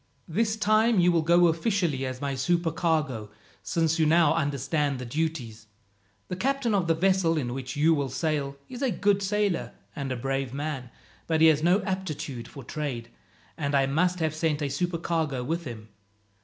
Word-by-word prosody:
"This 215 Hz, +6 st, 0 dB
time 215 Hz, 0 st, +3 dB
you 175 Hz, 0 st, +5 dB
will 170 Hz, -1 st, +3 dB
go 170 Hz, +2 st, +5 dB
officially 165 Hz, -, +1 dB
as 130 Hz, 0 st, -5 dB
my 140 Hz, -1 st, -1 dB
supercargo, 155 Hz, -5 st, 0 dB, 0.3 s
since 165 Hz, 0 st, 0 dB
you 160 Hz, -, +4 dB
now 165 Hz, -1 st, +5 dB
understand 145 Hz, -1 st, 0 dB
the 125 Hz, -, -6 dB
duties. 120 Hz, -6 st, -3 dB, 0.6 s
The -, -, -4 dB
captain 260 Hz, +2 st, 0 dB
of 190 Hz, -4 st, +1 dB
the 165 Hz, -, +3 dB
vessel 180 Hz, -1 st, +2 dB
in 120 Hz, -5 st, -2 dB
which 130 Hz, -1 st, -5 dB
you 155 Hz, +3 st, +4 dB
will 140 Hz, -3 st, -1 dB
sail 140 Hz, -1 st, -2 dB
is 250 Hz, 0 st, -8 dB
a 270 Hz, -, +2 dB
good 200 Hz, 0 st, +1 dB
sailor 200 Hz, -2 st, 0 dB, 0.2 s
and 140 Hz, -3 st, -4 dB
a -, -, -1 dB
brave 135 Hz, +1 st, -2 dB
man, 140 Hz, -4 st, -4 dB, 0.4 s
but 160 Hz, -1 st, +1 dB
he 160 Hz, 0 st, +7 dB
has 155 Hz, -1 st, +3 dB
no 180 Hz, +4 st, +3 dB
aptitude 160 Hz, -, -4 dB
for 140 Hz, -, -10 dB
trade, 120 Hz, -4 st, -5 dB, 0.4 s
and 145 Hz, -2 st, -1 dB
I 135 Hz, -1 st, +4 dB
must 175 Hz, +6 st, +1 dB
have 160 Hz, -1 st, +1 dB
sent 155 Hz, -2 st, 0 dB
a 140 Hz, -, -1 dB
supercargo 160 Hz, -3 st, -1 dB
with 165 Hz, +5 st, -2 dB
him. 110 Hz, -4 st, -8 dB
160 Hz, 180 wpm, -27 LUFS, 140-175 Hz, 0.6 s, he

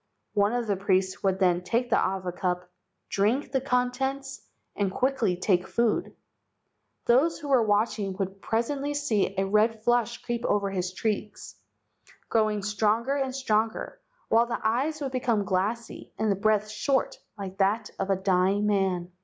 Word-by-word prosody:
One 205 Hz, 0 st, +3 dB
of 245 Hz, -1 st, 0 dB
the 205 Hz, -2 st, 0 dB
priests 190 Hz, -1 st, 0 dB
would 190 Hz, -2 st, +1 dB
then 180 Hz, -2 st, +2 dB
take 235 Hz, +6 st, -1 dB
the -, -, +4 dB
awa 185 Hz, -1 st, -1 dB
cup, 180 Hz, 0 st, -2 dB, 0.4 s
drink 240 Hz, +8 st, +1 dB
the 265 Hz, -1 st, +1 dB
contents, 265 Hz, +1 st, -1 dB, 0.3 s
and 200 Hz, -2 st, 0 dB
quickly 250 Hz, -7 st, +1 dB
take 185 Hz, -1 st, +1 dB
food. 235 Hz, +8 st, 0 dB, 0.9 s
"Those 280 Hz, +8 st, +3 dB
who 295 Hz, -3 st, -7 dB
were 265 Hz, -3 st, +5 dB
watching 210 Hz, -2 st, +1 dB
would 195 Hz, 0 st, -4 dB
presently 275 Hz, +6 st, -1 dB
see 220 Hz, -9 st, 0 dB
a 195 Hz, -, +2 dB
red 215 Hz, +2 st, +2 dB
flush 240 Hz, 0 st, +2 dB
creep 240 Hz, -1 st, -3 dB
over 200 Hz, -1 st, +1 dB
his 180 Hz, -1 st, -2 dB
cheeks, 210 Hz, -, -3 dB, 0.8 s
growing 215 Hz, -2 st, +1 dB
stronger 215 Hz, +5 st, +1 dB
and 265 Hz, -2 st, -1 dB
stronger, 225 Hz, -4 st, -1 dB, 0.3 s
while 230 Hz, +1 st, +4 dB
the 240 Hz, -, -2 dB
eyes 270 Hz, +8 st, 0 dB
would 275 Hz, -2 st, -2 dB
become 235 Hz, -5 st, 0 dB
glassy 205 Hz, +5 st, -2 dB
and 215 Hz, -1 st, +1 dB
the -, -, +2 dB
breath 215 Hz, +1 st, +2 dB
short 265 Hz, +6 st, 0 dB, 0.2 s
like 195 Hz, -1 st, -7 dB
that 205 Hz, +3 st, +1 dB
of 195 Hz, -, -2 dB
a 195 Hz, -, +3 dB
dying 190 Hz, +2 st, +2 dB
man. 190 Hz, -4 st, 0 dB
215 Hz, 160 wpm, -27 LUFS, 195-245 Hz, 0.9 s, were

